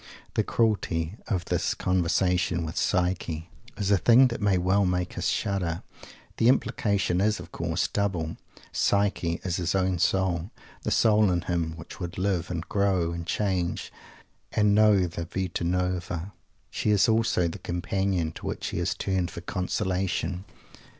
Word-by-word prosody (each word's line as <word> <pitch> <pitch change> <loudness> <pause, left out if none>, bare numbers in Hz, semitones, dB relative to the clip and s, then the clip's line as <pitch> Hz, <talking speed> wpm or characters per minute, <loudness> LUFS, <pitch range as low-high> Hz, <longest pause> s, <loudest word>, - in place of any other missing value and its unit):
The - - +2
cruelty 100 -6 0
of 90 -6 -1
this - - 0
conversation 90 -1 +1
with 80 +2 -6
"Psyche" 90 -3 -1 0.3
is 100 -1 0
a 100 - +5
thing 125 +5 +6
that 115 -2 -5
may 100 -2 +3
well 95 +3 +2
make 90 -1 -1
us 90 0 -1
shudder. 95 -6 -1 0.5
The 115 - +3
implication 100 -7 +1
is, 105 +1 +2
of - - -10
course, 85 +1 -1
double. 90 -6 -1 0.4
Psyche 100 -4 +1
is 90 -2 -1
his 85 +1 -1
own 95 -2 +1
soul; 90 -1 +1 0.3
the - - -2
soul 105 -2 +4
in 90 -1 +1
him 85 -2 -1
which 85 - -10
would 90 -2 -5
live, 95 -2 0
and 85 -2 -4
grow, 95 -4 +1
and 85 0 -5
change, 95 -4 -1 0.6
and 105 -1 +3
know 105 -3 +5
the 85 0 -5
"Vita 90 0 -3
Nuova." 90 +1 -2 0.4
She - - -1
is 105 +2 +4
also 110 -6 +2
"the 80 - -6
Companion," 90 -1 -1
to - - -8
whom - - -3
he - - -3
has 85 0 0
turned 95 -3 -1
for 85 - -8
consolation. 95 0 -2
90 Hz, 155 wpm, -27 LUFS, 85-100 Hz, 0.6 s, thing